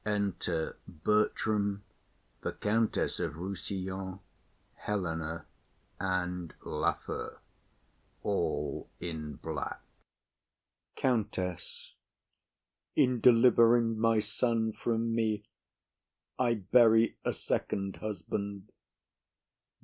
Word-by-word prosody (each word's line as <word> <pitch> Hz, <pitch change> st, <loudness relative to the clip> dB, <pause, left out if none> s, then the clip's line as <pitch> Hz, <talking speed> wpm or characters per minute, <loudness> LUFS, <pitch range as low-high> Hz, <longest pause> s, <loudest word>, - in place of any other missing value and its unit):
Enter 100 Hz, -6 st, -1 dB
Bertram, 100 Hz, +3 st, +1 dB, 0.6 s
the -, -, -2 dB
Countess 110 Hz, +2 st, +1 dB
of -, -, -1 dB
Rossillon, 95 Hz, +1 st, -4 dB, 0.5 s
Helena, 85 Hz, -5 st, -3 dB, 0.5 s
and 90 Hz, -2 st, -2 dB
Lafew, -, -, -2 dB, 0.9 s
all 80 Hz, -7 st, -1 dB
in 80 Hz, -4 st, -5 dB
black. -, -, -4 dB, 1.2 s
COUNTESS. 105 Hz, -8 st, -2 dB, 1.0 s
In 125 Hz, -1 st, +4 dB
delivering 115 Hz, -1 st, +6 dB
my 115 Hz, 0 st, +4 dB
son 110 Hz, +1 st, 0 dB
from 115 Hz, 0 st, 0 dB
me, 110 Hz, -2 st, +1 dB, 1.0 s
I 120 Hz, -2 st, +3 dB
bury 115 Hz, +2 st, +5 dB
a -, -, +1 dB
second 95 Hz, -1 st, -2 dB
husband. 100 Hz, 0 st, -4 dB
105 Hz, 75 wpm, -31 LUFS, 90-115 Hz, 1.2 s, delivering